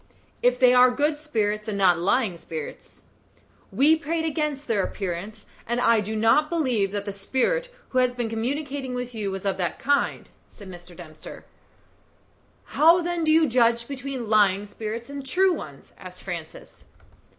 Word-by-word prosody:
"If 245 0 +3
they 250 -1 +6
are 250 0 +7
good 295 +4 0
spirits, 215 -7 -2
and 210 -2 -3
not 180 -3 +4
lying 200 +2 +1
spirits. 160 -2 -8 0.7
We 300 +4 +4
prayed 320 +1 -2
against 300 -2 -2
their 210 -5 +1
appearance, 200 +3 -5 0.2
and 240 +1 -1
I 230 -2 +4
do 215 +2 -4
not 225 +8 +3
believe 250 - 0
that 200 -1 -3
the 200 - -3
spirit 380 - -1 0.2
who 255 - +1
has 250 -1 +2
been 240 -2 -2
communicating 265 +3 -3
with 250 0 -5
you 210 -3 -3
was 195 0 -6
of 195 - 0
that 175 -2 -2
kind," 285 +1 0 0.2
said 200 -3 -12
Mr. 175 -1 -13
Dempster. 155 -3 -11 1.3
"How, 330 +3 +6
then, 345 -1 -2
do 310 - +2
you 320 0 +5
judge 235 -1 +2
between 270 -3 -5
lying 205 -2 +3
spirits 220 +2 -6
and 280 0 -7
true 370 +7 +2
ones?" - - -9
asked - - -11
Francis. - - -8
240 Hz, 165 wpm, -24 LUFS, 205-285 Hz, 1.3 s, are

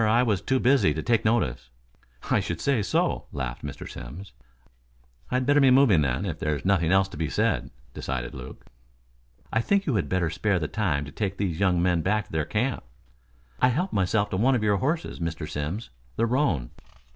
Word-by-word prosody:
I 115 +3 +4
was 105 -6 +1
too 130 +5 +1
busy 130 +2 +3
to - - -3
take 115 -3 +2
notice." 110 - 0 0.6
"I - - +4
should - - -3
say 135 -6 +1
so," 100 - 0
laughed 65 -3 -5
Mr. 70 -1 -6
Simms. 85 +10 -9 1.0
"I'd 125 0 0
better 145 +2 +4
be 135 - +6
moving 125 - +5
then, 70 +7 0
if 80 -5 -4
there's 75 0 -2
nothing 90 -4 +2
else 95 0 +4
to 90 - -10
be 80 -1 -2
said," - - 0 0.2
decided 65 -2 -4
Luke. 65 0 -10 0.9
"I 110 - +3
think 200 +9 +1
you 140 - 0
had 90 -10 0
better 90 -3 0
spare 100 +3 0
the 80 -3 -2
time 80 -10 -1
to 70 - -9
take 100 -2 -3
these 95 -5 -2
young 90 -3 +2
men 90 -2 +2
back 105 +4 0
to - - -19
their 80 -2 -1
camp." 125 +5 -1 0.8
"I - - +6
helped 170 +10 -1
myself 100 +2 +1
to 95 - -1
one 130 +6 +3
of 115 - -1
your 105 -1 +3
horses, 155 - -2
Mr. 80 -2 -3
Simms. 75 - -4 0.2
The 115 - +2
roan." 115 - 0
95 Hz, 200 wpm, -26 LUFS, 80-120 Hz, 1.0 s, be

